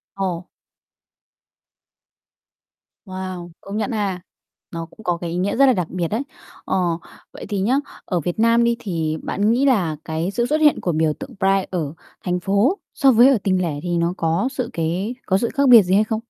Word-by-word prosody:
Ồ. 185 -2 -3 2.6
Wow! 185 -2 -6
Công 200 +1 -6
nhận 220 +4 -1
ha. 200 -5 -2 0.5
Nó 165 -1 -5
cũng 220 +6 -17
có 175 -3 0
cái 170 0 -5
ý 170 - -3
nghĩa 190 +4 0
rất 275 - +6
là 260 - +5
đặc 180 -6 -1
biệt 175 -2 -2
đấy. 220 +9 -2 0.4
Ờ. 190 - 0 0.5
Vậy - - -9
thì 205 -2 -1
nhá, 230 +7 +2 0.3
ở 180 -3 -1
Việt 175 +6 -4
Nam 230 +1 +4
đi 235 0 +2
thì 160 -7 -2
bạn 205 +3 +1
nghĩ 255 +4 +2
là 190 - +2
cái 160 +3 -2
sự 235 +3 0
xuất 305 +5 0
hiện 300 -2 +4
của 175 - 0
biểu 155 -1 +1
tượng - - -9
Pride 195 0 +2
ở 160 -6 -2 0.3
thành 180 -1 -1
phố 200 - +1
so 275 -3 +4
với 240 +2 +7
ở 270 - +4
tỉnh 185 -2 +1
lẻ 155 -5 -2
thì 175 -1 -1
nó 170 +1 +1
có 165 +8 0
sự 255 -3 -3
cái 175 +8 -2
có 190 - +2
sự 235 +4 -1
khác 280 -2 +3
biệt 235 -3 +10
gì 180 - -1
hay 210 - +5
không? 220 0 -2
190 Hz, 205 wpm, -21 LUFS, 175-230 Hz, 2.6 s, biệt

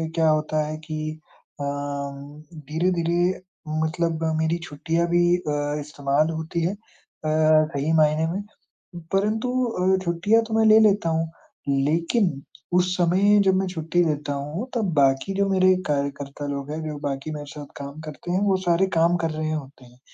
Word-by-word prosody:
क्या 160 -1 +3
होता 155 0 +1
है 155 0 -4
कि 155 0 -4 0.4
अम, 140 +1 -5 0.3
धीरे-धीरे 175 +2 +1 0.4
मतलब 165 0 -1 0.2
मेरी 160 +2 +1
छुट्टियाँ 165 +2 -1
भी 175 0 +3
अ, 145 -3 -2
इस्तेमाल 145 +1 0
होती 160 +1 -3
हैं, 180 +4 0 0.5
अ, - - +1 0.4
सही 140 +3 -1
मायने 155 0 +3
में। 195 +3 -2 0.7
परंतु 215 +5 +1 0.2
अ, 190 -4 +1
छुट्टियाँ 180 +7 +2
तो 220 - -5
मैं 220 0 +3
ले 215 0 +7
लेता 205 -5 +3
हूँ, 165 0 0 0.4
लेकिन 160 - +1 0.3
उस 180 0 +2
समय 190 +4 +4
जब 190 -1 +4
मैं 190 0 +1
छुट्टी 175 0 0
लेता 150 -2 -1
हूँ, 150 - -4
तब 200 -8 0
बाकी 135 +6 +2
जो 200 0 +1
मेरे 185 -1 +4
कार्यकर्ता 140 0 -3
लोग 140 +1 -4
हैं, 160 +1 -4
जो 150 -1 -4
बाकी 140 +2 -3
मेरे 150 -1 -6
साथ 145 -1 -8
काम 140 +2 -7
करते 155 +3 -7
हैं, 185 - +2
वो 190 -2 +3
सारे 175 +3 +3
काम 170 +2 +4
कर 165 - +1
रहे 155 0 -2
होते 140 -4 -6
हैं 125 +1 -20
160 Hz, 165 wpm, -24 LUFS, 145-180 Hz, 0.7 s, ले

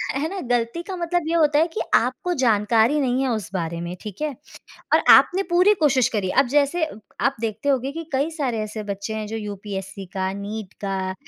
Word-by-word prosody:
है 295 +3 0
ना 390 0 -5
गलती 240 +6 0
का 380 +1 -6
मतलब 350 -1 -1
ये 330 - 0
होता 300 -2 +4
है 330 - +3
कि 340 - -4
आपको 360 -1 +1
जानकारी 225 +4 +3
नहीं 255 0 +1
है 260 - 0
उस 215 -6 -2
बारे 170 -2 -3
में, 175 +1 -5
ठीक 210 +4 -8
है? 305 - +1 0.7
और - - +4
आपने 380 +2 +7
पूरी 365 +4 +5
कोशिश 265 -5 +4
करी। 205 -5 -2
अब - - -6
जैसे 290 +4 +2
अ, 310 - -8 0.2
आप 275 0 +1
देखते 225 +4 -3
होंगे 270 0 +1
कि 330 +1 -6
कई 280 +4 +1
सारे 275 -8 -2
ऐसे 215 0 -5
बच्चे 200 +2 -4
हैं, 215 -1 -3
जो 225 - -5
यूपीएससी 195 -2 -6
का, 190 0 -1
नीट 200 0 -6
का, 190 -1 -2
235 Hz, 215 wpm, -23 LUFS, 205-300 Hz, 0.7 s, आपने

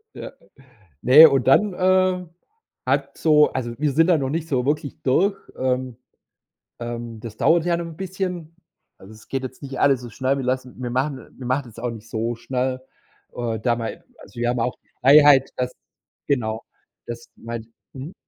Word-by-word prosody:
Ja. - - -7 0.7
Ne, 150 +6 +9
und 135 -3 0
dann, 200 +8 +4
äh, 185 0 +2 0.6
hat - - -1
so 150 -2 +4
also, 120 -2 -4
wir 150 0 0
sind 165 +5 +3
da 175 -3 +4
noch 135 -2 -2
nicht 160 +2 -3
so 130 -4 0
wirklich 145 -1 -2
durch. 195 +10 +2 0.2
Ähm 130 -2 -1 0.8
ähm, 120 -1 -6
das 110 -1 -9
dauert 165 +1 +3
ja 170 -1 +2
noch 170 0 -4
'n 165 -1 -10
bisschen. 180 -3 -5 0.4
Also, 95 +3 -14
es 110 - -17
geht 135 -1 -2
jetzt 130 +2 -8
nicht 135 -1 -6
alles 135 -3 +4
so 120 - -8
schnell. 135 +3 0
Wir 130 - -3
lassen 130 0 -2
wir 125 - -3
machen 135 +1 -2
wir 130 - -8
machen 130 +1 0
das 115 -1 -12
auch 120 0 -2
nicht 115 0 -10
so 115 +1 -2
schnell. 130 +2 -2 0.5
Äh, 115 -3 -2
da 120 +1 +1
mal, 115 -1 -5 0.2
also 120 - -12
wir 120 - 0
haben 120 -1 -1
auch 125 +2 -1 0.3
Freiheit, 140 0 +7
dass 125 0 -2 0.5
genau, 110 -5 -1 0.4
das 120 0 -7
meint 115 -1 -7 0.3
mhm. 140 +6 -8
130 Hz, 185 wpm, -22 LUFS, 120-150 Hz, 0.8 s, Ne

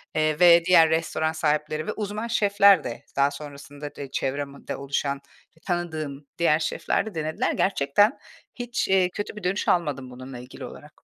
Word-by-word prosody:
eee, 155 -1 +1
ve 170 -1 +7
diğer 170 -3 +6
restoran 160 -1 0
sahipleri 155 0 -1
ve - - -2
uzman 210 +2 -4
şefler 200 -3 +4
de 115 - -7
daha 140 +1 +3
sonrasında 145 0 -9
de 140 -2 -8
çevremde 140 +1 -3
oluşan, 140 0 -2 0.4
tanıdığım 155 -6 -3
diğer 160 -2 +3
şefler 155 - -1
de 215 - -8
denediler. 155 0 -1
Gerçekten 195 - +2 0.4
hiç, 245 -1 -2
eee, 190 -2 +3
kötü 205 +3 -5
bir 210 - -9
dönüş 190 +3 -1
almadım 145 -7 0
bununla 130 0 -9
ilgili 125 +1 -9
olarak. - - -13
155 Hz, 155 wpm, -25 LUFS, 140-180 Hz, 0.4 s, ve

